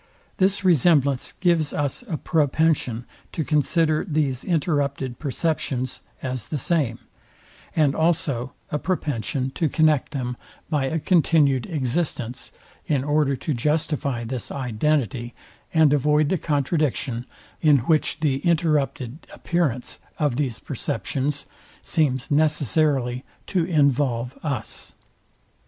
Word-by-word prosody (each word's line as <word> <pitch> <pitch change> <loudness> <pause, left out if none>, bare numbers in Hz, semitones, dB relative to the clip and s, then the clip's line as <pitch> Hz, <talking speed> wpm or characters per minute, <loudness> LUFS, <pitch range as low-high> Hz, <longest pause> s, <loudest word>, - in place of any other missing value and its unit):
This 195 0 +2
resemblance 145 -6 +3
gives 170 -4 +2
us 145 - -1
a 165 -7 -2
propension 145 -7 +1 0.3
to 160 - -1
consider 155 +1 +2
these 145 -5 -1
interrupted 140 -6 -1
perceptions 140 -3 -1 0.2
as 130 -4 -3
the 155 - -2
same; 140 -5 0 0.8
and 150 -4 +3
also 155 -7 0 0.2
a 150 - 0
propension 140 -7 -2
to 155 +3 0
connect 155 -3 +2
them 125 -3 -3 0.3
by 145 -3 +1
a 160 +5 -1
continued 155 -6 +3
existence, 135 -4 -2 0.4
in 145 -6 +1
order 145 -1 +2
to 150 +3 -3
justify 145 -2 0
this 120 0 -4
identity, 125 -1 -1 0.4
and 160 -3 +5
avoid 150 +1 +3
the 190 - +2
contradiction, 140 -5 -1 0.3
in 150 -3 +6
which 155 0 +1
the 140 -4 +1
interrupted 150 -5 0
appearance 145 -8 -1 0.2
of 145 -5 +1
these 130 -5 -1
perceptions 140 +3 -2 0.4
seems 145 -4 0
necessarily 145 -4 +2 0.2
to 180 -4 0
involve 140 -6 +1
us. 140 -8 -4
145 Hz, 110 wpm, -24 LUFS, 130-155 Hz, 0.8 s, in